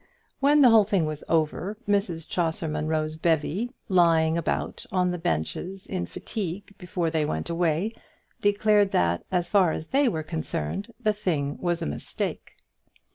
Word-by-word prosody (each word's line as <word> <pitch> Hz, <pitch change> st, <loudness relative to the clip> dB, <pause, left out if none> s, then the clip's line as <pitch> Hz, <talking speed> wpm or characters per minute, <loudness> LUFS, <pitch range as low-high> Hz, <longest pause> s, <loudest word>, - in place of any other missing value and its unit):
When 290 Hz, +2 st, +5 dB
the 250 Hz, -4 st, +8 dB
whole 220 Hz, -2 st, +7 dB
thing 195 Hz, -5 st, +1 dB
was 155 Hz, -1 st, -4 dB
over, 165 Hz, +5 st, 0 dB
Mrs 195 Hz, -6 st, 0 dB
Chaucer 165 Hz, -2 st, -1 dB
Munro's 155 Hz, 0 st, -1 dB
bevy, 165 Hz, +7 st, 0 dB, 0.2 s
lying 165 Hz, -4 st, +4 dB
about 170 Hz, -2 st, -2 dB
on 180 Hz, -1 st, +2 dB
the 180 Hz, -, -3 dB
benches 165 Hz, -, -3 dB
in 185 Hz, -2 st, -3 dB
fatigue 200 Hz, -2 st, -5 dB
before 175 Hz, -3 st, -2 dB
they 160 Hz, -1 st, +1 dB
went 80 Hz, -, -2 dB
away, 170 Hz, +5 st, 0 dB, 0.5 s
declared 205 Hz, 0 st, +3 dB
that, 85 Hz, 0 st, +2 dB
as 175 Hz, -2 st, +1 dB
far 185 Hz, -3 st, +3 dB
as 160 Hz, -, -6 dB
they 275 Hz, -1 st, +3 dB
were 160 Hz, -5 st, -3 dB
concerned, 160 Hz, -, -4 dB
the 215 Hz, -3 st, +2 dB
thing 160 Hz, -9 st, -1 dB
was 175 Hz, -1 st, -1 dB
a -, -, -2 dB
mistake. 75 Hz, -, -4 dB
175 Hz, 155 wpm, -26 LUFS, 155-200 Hz, 0.5 s, the